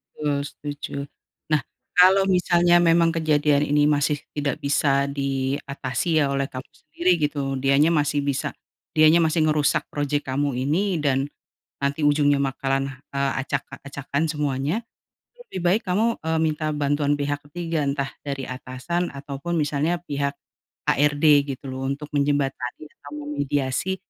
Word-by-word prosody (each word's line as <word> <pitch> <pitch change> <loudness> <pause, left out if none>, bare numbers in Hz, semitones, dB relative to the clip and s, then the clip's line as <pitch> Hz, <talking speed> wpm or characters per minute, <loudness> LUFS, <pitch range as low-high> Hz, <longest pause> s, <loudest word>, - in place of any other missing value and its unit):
Betul. 145 -2 -1
Setuju. 145 0 -7 0.6
Nah. 150 -2 +4 0.3
Kalo 190 +2 +6
misalnya 175 -1 +4
memang 165 -1 +4
kejadian 150 -3 +2
ini 145 0 +4
masih 150 0 +2 0.2
tidak 145 -2 -1
bisa 140 -1 +2
diatasi 140 +2 -2
ya - - +3
oleh 135 0 -1
kamu 130 0 -7
sendiri 170 +4 -1
gitu, 145 -2 -1
dianya 140 +4 +4
masih 145 -2 +1
bisa 140 -2 -1 0.5
dianya 155 +2 +6
masih 160 0 +2
ngerusak 150 -2 +2
project 145 0 -1
kamu 140 +1 -1
ini 165 +8 0
dan 140 -1 +1 0.5
nanti 140 +2 -1
ujungnya 145 -1 +4
bakalan, 135 0 0 0.2
eee, 140 -1 0
acak-acakan 140 +2 -3
semuanya, 150 - -1 0.5
itu 485 - -23
lebih 185 - -5
baik 185 +6 +3
kamu, 220 +6 +2
eee, 160 0 -1
minta 155 0 -1
bantuan 145 0 +1
pihak 145 0 -2
ketiga, 165 -1 -2
entah 140 -1 -1 0.2
dari 140 -2 -3
atasan 130 +7 -3
atau 140 0 -6
pun 170 +3 -4
misalnya 150 +2 +1
pihak, 140 -3 -1 0.6
HRD, 145 +2 +2 0.3
gitu 135 - -11
loh 130 0 -4
untuk 145 +2 -4
menjembatani 140 -2 -1 0.2
atau 145 - -11
memediasi 145 +4 -1
145 Hz, 140 wpm, -24 LUFS, 140-160 Hz, 0.6 s, Kalo